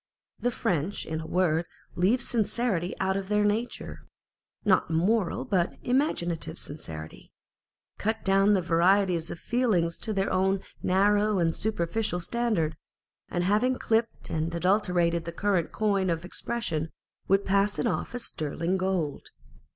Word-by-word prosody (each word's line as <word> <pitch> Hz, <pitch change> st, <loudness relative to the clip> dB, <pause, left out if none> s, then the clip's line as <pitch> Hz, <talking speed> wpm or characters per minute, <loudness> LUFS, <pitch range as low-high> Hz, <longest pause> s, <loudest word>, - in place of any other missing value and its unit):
The 245 Hz, -, +1 dB
French 180 Hz, -5 st, -1 dB
in 160 Hz, 0 st, -3 dB
a 160 Hz, -, -7 dB
word 175 Hz, -2 st, +1 dB, 0.3 s
leave 215 Hz, +8 st, +2 dB
sincerity 215 Hz, -6 st, 0 dB
out 190 Hz, 0 st, +1 dB
of 195 Hz, -1 st, -3 dB
their 210 Hz, 0 st, +2 dB
nature 220 Hz, +4 st, -2 dB, 0.6 s
(not 190 Hz, -5 st, +3 dB
moral 195 Hz, +8 st, +1 dB
but 190 Hz, -8 st, 0 dB
imaginative 175 Hz, -, 0 dB
sincerity), 80 Hz, -, -9 dB, 0.7 s
cut 220 Hz, +2 st, -1 dB
down 195 Hz, +1 st, +4 dB
the 185 Hz, -, +1 dB
varieties 175 Hz, 0 st, +3 dB
of -, -, -5 dB
feeling 215 Hz, -7 st, +1 dB
to 215 Hz, +6 st, -5 dB
their 195 Hz, -2 st, 0 dB
own 190 Hz, +1 st, +2 dB, 0.2 s
narrow 205 Hz, +2 st, +3 dB
and 165 Hz, -2 st, +1 dB
superficial 210 Hz, -1 st, -1 dB
standard, 180 Hz, -5 st, 0 dB, 0.5 s
and 175 Hz, -1 st, -1 dB
having 215 Hz, +7 st, +2 dB
clipped 225 Hz, 0 st, -1 dB
and 160 Hz, +1 st, -1 dB
adulterated 175 Hz, -2 st, +2 dB
the 170 Hz, -, -4 dB
current 185 Hz, -1 st, 0 dB
coin 200 Hz, -3 st, +1 dB
of 165 Hz, 0 st, -1 dB
expression, 180 Hz, -5 st, -3 dB, 0.4 s
would 195 Hz, +1 st, +3 dB
pass 200 Hz, +1 st, +2 dB
it -, -, 0 dB
off 235 Hz, -, -1 dB
as 245 Hz, -, -3 dB
sterling 165 Hz, +3 st, -2 dB
gold. 185 Hz, -6 st, -2 dB
190 Hz, 140 wpm, -28 LUFS, 170-210 Hz, 0.7 s, down